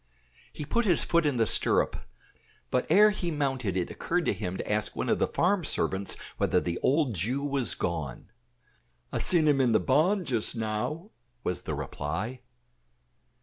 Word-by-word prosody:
He 150 - -6
put 235 +10 0
his 175 - +3
foot 170 -2 +2
in 140 -4 0
the 115 - +3
stirrup, 100 - +2 0.8
but 125 - +1
ere 210 +1 +6
he 185 -4 -3
mounted 135 - -1
it 90 - -2
occurred 175 -1 -1
to - - +2
him 95 -2 -4
to - - -5
ask 105 0 0
one - - -2
of - - +2
the - - +2
farm 185 +1 +1
servants 95 -8 0 0.2
whether - - +2
the 85 0 -3
old 140 -2 +2
Jew 120 +10 -2
was 135 - 0
gone. 80 +1 -4 0.8
"I - - -2
sin 165 -4 +3
him 140 -2 +4
in 120 -3 +3
the - - +5
barn 175 +8 +2
just 120 -3 0
now," 115 - -3 0.3
was 90 - -2
the - - -4
reply. 95 - -4
130 Hz, 175 wpm, -28 LUFS, 105-165 Hz, 0.8 s, ere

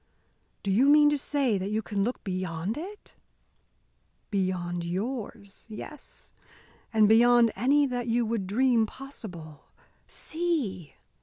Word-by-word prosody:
"Do 200 - -1
you 240 +8 +4
mean 295 0 +6
to 295 - +1
say 265 -8 0
that 190 +2 -3
you 215 +1 -1
can 200 -2 -1
look 245 +4 -3
beyond 185 0 -3
it?" 390 +7 -9 1.2
"Beyond 180 -3 -1
yours 200 +3 -5
yes. 250 +7 -10 0.6
And 215 -2 +4
beyond 235 +1 +5
any 280 +7 +3
that 245 -2 -3
you 235 +1 +1
would 220 -4 -2
dream 235 +1 +2
possible 185 - -10 0.4
See! 290 - -3
220 Hz, 125 wpm, -27 LUFS, 190-265 Hz, 1.2 s, mean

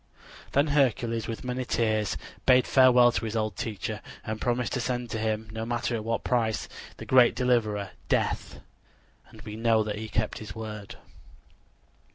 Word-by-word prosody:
Then 145 +2 +3
Hercules 120 -5 +1
with 115 - -5
many 125 0 -2
tears 110 -4 0 0.3
bade 125 -1 +6
farewell 125 -2 +6
to 115 - -2
his 110 0 -4
old 110 -3 -1
teacher 105 0 -4 0.2
and 110 0 -4
promised 120 -1 0
to 125 - 0
send 125 -1 -3
to 110 - -2
him, 110 0 -1
no 110 +1 -4
matter 120 +1 -2
at 110 -2 -2
what 115 +1 -2
price, 115 -3 0 0.3
the - - -8
great 125 -3 +5
deliverer, 110 -6 +1 0.2
Death. - - -1 0.7
And - - -14
we 105 -2 -7
know 115 -1 +3
that 105 -1 -4
he 110 0 -6
kept 110 -1 -1
his 110 +1 -8
word. 110 0 -7
115 Hz, 170 wpm, -27 LUFS, 110-125 Hz, 0.7 s, bade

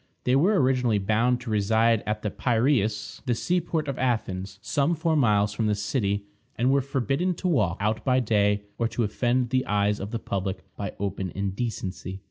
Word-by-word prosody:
They 125 - +2
were 185 +8 +4
originally 125 -4 +2
bound 110 +5 +2
to 120 -2 -5
reside 110 +2 +3
at 105 0 -2
the 105 - -1
Piræus, 115 -3 0
the 120 - +2
sea 175 +9 0
port 160 -2 -2
of 135 -2 -3
Athens, 100 -7 -1
some 145 +8 0
four 160 0 0
miles 105 -7 +3
from 110 +1 0
the 105 - +2
city, 100 -1 -1 0.3
and 125 +3 +2
were 140 0 +3
forbidden 140 +7 -1
to 185 - -3
walk 105 - +1
out 105 +2 -1
by 130 -1 +3
day, 105 -3 +2 0.2
or 115 - +2
to 115 +1 -1
offend 120 +3 0
the 130 0 +2
eyes 105 0 +1
of 100 - -5
the 115 - -2
public 95 -3 -3
by 100 -2 -5
open 95 -1 -2
indecency. 100 -2 -4
115 Hz, 190 wpm, -26 LUFS, 100-130 Hz, 0.3 s, were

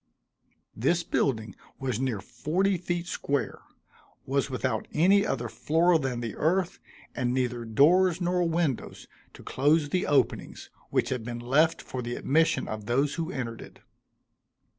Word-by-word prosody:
This 165 +10 +1
building 110 - -1 0.2
was 130 -4 -2
near 125 -6 -1
forty 185 - 0
feet 175 0 -3
square; 145 -5 -2 0.7
was 140 +1 0
without 130 0 -2
any 195 +6 +4
other 120 - -2
floor 160 +9 +2
than 130 -4 -2
the 115 -2 -4
earth, 175 +3 0 0.4
and 120 -1 0
neither 120 -2 -1
doors 170 +10 +4
nor 180 0 0
windows, 160 -7 -2 0.3
to - - -13
close 145 +2 +2
the 180 +4 0
openings 145 - 0 0.2
which - - 0
had 125 -3 -2
been 120 +1 -5
left 140 +7 +2
for 130 - -5
the 120 0 -4
admission 160 +4 +1
of 110 -1 -6
those 135 +4 +1
who 165 +1 -3
entered 120 -7 -5
it. - - -12
140 Hz, 145 wpm, -27 LUFS, 120-170 Hz, 0.7 s, any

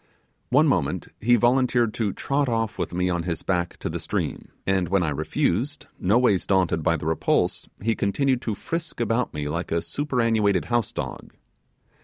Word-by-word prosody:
One - - +5
moment - - 0
he 120 +3 +4
volunteered 120 -1 +3
to 110 -4 -1
trot 140 +6 0
off 115 -2 -1
with - - -2
me 90 +1 0
on 85 -1 0
his 85 -1 -3
back 90 -2 -1
to - - -2
the - - -3
stream; - - -3 0.2
and 95 -2 +1
when 95 -1 +2
I 80 - 0
refused, 95 - -1
noways 100 0 +3
daunted 95 -4 +2
by 85 +1 +2
the 75 - -7
repulse, 80 0 0
he 115 +1 +2
continued 130 +6 +1
to 110 -5 -2
frisk 165 +3 -4
about 115 +1 0
me 75 -1 -4
like 85 +4 -3
a 85 - +2
superannuated 115 - +1
house 120 -1 0
dog. - - -6
105 Hz, 175 wpm, -25 LUFS, 90-120 Hz, 0.2 s, One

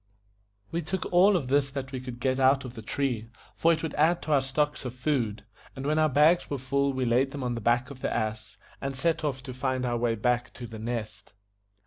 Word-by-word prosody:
We 170 - -1
took 175 +3 -3
all 190 +2 +6
of 140 -7 -3
this 140 +1 +2
that 135 -1 -5
we 130 - -4
could 125 -1 -8
get 130 0 0
out 135 +1 +4
of 125 - -7
the 115 - -8
tree, 115 -1 -2 0.2
for 165 - +3
it 165 0 0
would 160 - -3
add 170 +4 +2
to 155 - -3
our 140 -2 +5
stock 145 +3 -1
of 125 -1 -5
food; 125 -6 -1 0.3
and 135 - -6
when 155 +2 +2
our 155 0 +4
bags 150 +5 +4
were 140 - -1
full 140 +2 0
we 130 -1 -1
laid 125 +3 +3
them 140 -1 -6
on 125 -1 -1
the 115 - -4
back 120 +4 +1
of 130 -2 -11
the - - -1
ass, 110 0 -3 0.2
and 135 0 -3
set 160 +4 0
off 135 -3 -2
to 130 - -6
find 130 0 -1
our 120 -1 0
way 115 -1 +1
back 120 +2 0
to 125 - -7
The 115 -1 -8
Nest. 110 -3 -5
130 Hz, 245 wpm, -28 LUFS, 120-145 Hz, 0.3 s, all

